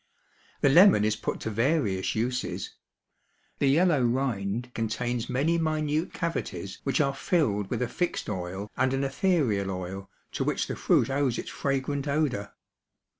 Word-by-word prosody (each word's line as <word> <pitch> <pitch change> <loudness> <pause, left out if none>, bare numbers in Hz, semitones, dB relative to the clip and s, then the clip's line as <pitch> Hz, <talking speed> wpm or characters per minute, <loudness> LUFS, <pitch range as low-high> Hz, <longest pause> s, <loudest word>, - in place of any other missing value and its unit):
The 140 - +5
lemon 170 - +7
is 110 0 +1
put - - -4
to 110 - -3
various 115 -5 +1
uses. 125 +3 -2 0.9
The 140 - +3
yellow 160 0 +4
rind 120 -2 -1
contains 115 +1 -2
many 160 +6 +1
minute 155 0 0
cavities 100 - -4
which 135 - 0
are 140 -2 +2
filled 105 - 0
with - - -1
a - - -1
fixed 175 +8 -2
oil 95 +1 -4
and 130 +1 +1
an 135 - -1
ethereal 135 - +1
oil 95 +1 -5 0.2
to - - -2
which - - 0
the - - -4
fruit - - +2
owes 135 -3 +1
its - - -5
fragrant 140 +1 -2
odor. 140 -9 0
130 Hz, 150 wpm, -27 LUFS, 105-145 Hz, 0.9 s, lemon